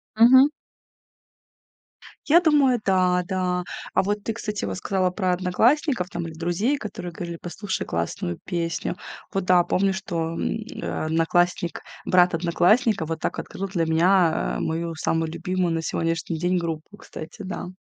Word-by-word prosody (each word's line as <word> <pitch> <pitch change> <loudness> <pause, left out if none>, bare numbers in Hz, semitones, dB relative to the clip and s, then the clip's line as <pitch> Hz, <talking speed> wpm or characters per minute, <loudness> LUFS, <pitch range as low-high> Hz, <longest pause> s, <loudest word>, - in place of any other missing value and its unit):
Мгм. 255 +5 +8 1.8
Я 325 +4 +6
думаю, 285 -7 +4
да, 185 -1 +3
да. 180 -1 -1 0.3
А - - +3
вот 205 +1 -2
ты, 225 - -2
кстати, 210 -2 -4
вот 95 -1 -3
сказала 185 - 0
про 185 -1 0
одноклассников 190 - +2
там 170 -3 -4
или 165 - -8
друзей, 175 - 0
которые 200 -7 -6
говорили: 170 0 -6
"Послушай 190 +3 -4
классную 85 +1 -3
песню". 170 -1 -2 0.4
Вот 195 -1 -1
да, 180 -1 +5
помню, 195 +2 +1
что, 170 -4 -3
м, - - -5 0.3
э, - - -4
одноклассник 170 +2 +1 0.2
брат 180 -1 +4
одноклассника, 175 +4 +2
вот 160 0 -4
так - - -2
открыл 195 - -5
для 175 -4 -1
меня, 160 - +3
э, - - -4
мою 165 +1 -2
самую 160 0 -1
любимую 180 0 -1
на 165 - -1
сегодняшний 165 0 -2
день 180 +3 +1
группу, 165 +3 -4
кстати. 160 +5 -9
Да. 185 -1 -5
180 Hz, 150 wpm, -24 LUFS, 165-195 Hz, 1.8 s, Мгм